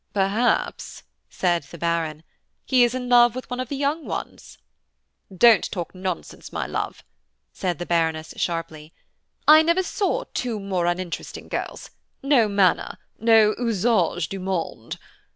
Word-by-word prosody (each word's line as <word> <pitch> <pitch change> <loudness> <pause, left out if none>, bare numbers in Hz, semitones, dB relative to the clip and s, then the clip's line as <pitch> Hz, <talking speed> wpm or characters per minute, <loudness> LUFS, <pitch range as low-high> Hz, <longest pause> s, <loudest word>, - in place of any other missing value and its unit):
"Perhaps," 205 +5 0 0.3
said 175 -2 0
the 170 - -10
Baron, 165 -2 -2 0.4
"he 255 -2 +4
is 240 +1 +1
in 250 -1 -4
love 240 -1 +5
with 255 - -6
one 250 - -3
of 255 -2 -4
the 285 - -3
young 290 +3 -1
ones." - - -7 0.7
"Don't 215 +1 +5
talk 175 -3 -5
nonsense, 185 -2 -6
my - - -3
love," - - -4 0.5
said 180 -4 -2
the 175 - -5
Baroness, 160 -2 -1
sharply, 165 -2 -4 0.5
"I 310 +1 +9
never 335 +4 +2
saw 430 +6 -1
two 235 -4 -2
more 190 -3 -1
uninteresting 175 0 -4
girls–no 275 -5 -1
manner, 200 -3 +1 0.2
no 220 -1 +5
usage 205 -8 +1
du 195 - -6
monde. 180 -11 -4
195 Hz, 135 wpm, -23 LUFS, 170-245 Hz, 0.7 s, I